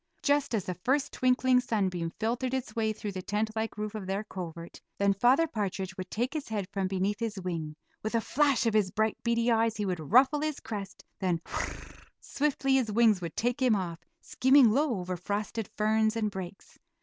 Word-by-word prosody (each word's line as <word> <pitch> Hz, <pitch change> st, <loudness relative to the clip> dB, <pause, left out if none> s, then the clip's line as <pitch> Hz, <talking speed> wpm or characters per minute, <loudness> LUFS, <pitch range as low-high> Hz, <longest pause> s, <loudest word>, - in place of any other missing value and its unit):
Just 285 Hz, -4 st, +2 dB
as 200 Hz, -, -1 dB
the 180 Hz, -, -2 dB
first 265 Hz, +10 st, 0 dB
twinkling 255 Hz, 0 st, +3 dB
sunbeam 190 Hz, -8 st, -1 dB
filtered 245 Hz, +4 st, -1 dB
its 245 Hz, -4 st, -4 dB
way 220 Hz, -1 st, +1 dB
through 210 Hz, -1 st, -5 dB
the 185 Hz, -1 st, -5 dB
tent 210 Hz, +3 st, -1 dB
like 220 Hz, -1 st, -3 dB
roof 210 Hz, 0 st, -3 dB
of 210 Hz, -4 st, -6 dB
their 195 Hz, +2 st, -1 dB
covert, 170 Hz, -4 st, -8 dB, 0.2 s
then 200 Hz, 0 st, +3 dB
Father 250 Hz, -, +4 dB
Partridge 195 Hz, -, -3 dB
would 185 Hz, 0 st, -6 dB
take 245 Hz, +5 st, -2 dB
his 310 Hz, -3 st, -4 dB
head 205 Hz, -4 st, -3 dB
from 195 Hz, -2 st, -1 dB
beneath 195 Hz, +2 st, -1 dB
his 220 Hz, -4 st, -3 dB
wing; 165 Hz, -4 st, -4 dB, 0.3 s
with 220 Hz, +2 st, -3 dB
a -, -, +4 dB
flash 280 Hz, 0 st, +2 dB
of 225 Hz, -, +2 dB
his 210 Hz, -3 st, +3 dB
bright, 220 Hz, +3 st, 0 dB
beady 235 Hz, 0 st, +2 dB
eyes 225 Hz, 0 st, +2 dB
he 210 Hz, -, -1 dB
would 180 Hz, -3 st, -2 dB
ruffle 270 Hz, +5 st, +5 dB
his 310 Hz, -2 st, -2 dB
crest, 200 Hz, -3 st, -7 dB, 0.2 s
then 180 Hz, -3 st, 0 dB
"whir -, -, -12 dB
r -, -, -1 dB
r," -, -, -12 dB, 0.2 s
swiftly 275 Hz, -2 st, 0 dB
his 235 Hz, -5 st, 0 dB
wings 220 Hz, -3 st, +4 dB
would 165 Hz, -2 st, -5 dB
take 245 Hz, +3 st, -1 dB
him 250 Hz, -4 st, +4 dB
off, 175 Hz, -4 st, -3 dB, 0.2 s
skimming 260 Hz, -3 st, +5 dB
low 265 Hz, -3 st, +1 dB
over 180 Hz, 0 st, -3 dB
frosted 205 Hz, +4 st, -3 dB
ferns 220 Hz, +1 st, +2 dB
and 215 Hz, -2 st, 0 dB
brakes. 190 Hz, 0 st, -8 dB
215 Hz, 210 wpm, -29 LUFS, 190-245 Hz, 0.3 s, ruffle